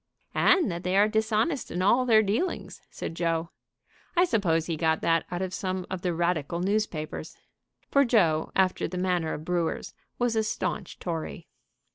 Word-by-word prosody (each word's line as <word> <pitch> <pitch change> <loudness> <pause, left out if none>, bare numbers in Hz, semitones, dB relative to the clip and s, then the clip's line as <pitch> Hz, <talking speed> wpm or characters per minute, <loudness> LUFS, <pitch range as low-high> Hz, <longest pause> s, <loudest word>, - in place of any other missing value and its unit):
"And 340 - +4
that 170 0 -4
they 180 +2 +1
are 205 +1 +6
dishonest 220 +6 0
in 180 +2 -2
all 250 +6 +4
their 220 -2 +6
dealings," 220 - -2
said - - -6
Joe. 165 0 -1 0.7
"I 355 - +6
suppose 175 - +1
he 165 - -2
got 160 0 +1
that 165 -1 +2
out 175 +1 -2
of 185 -1 -4
some 185 -1 -3
of 190 -2 -3
the 180 - 0
radical 170 -1 -1
news 210 +4 +1
papers." 155 -2 -6 0.5
For 280 - +5
Joe, 170 - +2
after 185 -1 +2
the 180 - -6
manner 180 -3 0
of 155 - -8
brewers, 175 -2 -1 0.2
was 240 -2 +1
a 220 - +3
staunch 215 -3 -3
Tory. 165 -3 -5
185 Hz, 175 wpm, -27 LUFS, 165-215 Hz, 0.7 s, are